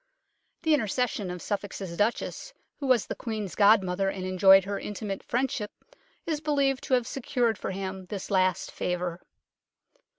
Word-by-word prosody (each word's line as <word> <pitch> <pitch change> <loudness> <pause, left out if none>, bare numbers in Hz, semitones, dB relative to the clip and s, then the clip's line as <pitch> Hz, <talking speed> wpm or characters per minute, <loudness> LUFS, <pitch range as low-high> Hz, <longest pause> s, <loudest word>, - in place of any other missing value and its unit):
The 320 -1 +4
intercession 225 -5 0
of 180 -1 -6
Suffolk's 205 -1 -3
Duchess, 205 - -2 0.2
who 280 - -3
was 255 -4 +4
the - - -4
Queen's 215 -6 -4
godmother 195 -2 +4
and 185 -1 -4
enjoyed 190 +1 +6
her 200 0 -3
intimate 205 -2 -5
friendship, 240 -4 -1 0.6
is 310 -2 -2
believed 280 -3 +1
to 260 - +3
have 245 -2 +1
secured 245 -3 0
for 185 - -5
him 190 -1 -5
this 200 0 -6
last 185 -1 +2
favour. 180 -1 -3
205 Hz, 145 wpm, -28 LUFS, 190-245 Hz, 0.6 s, enjoyed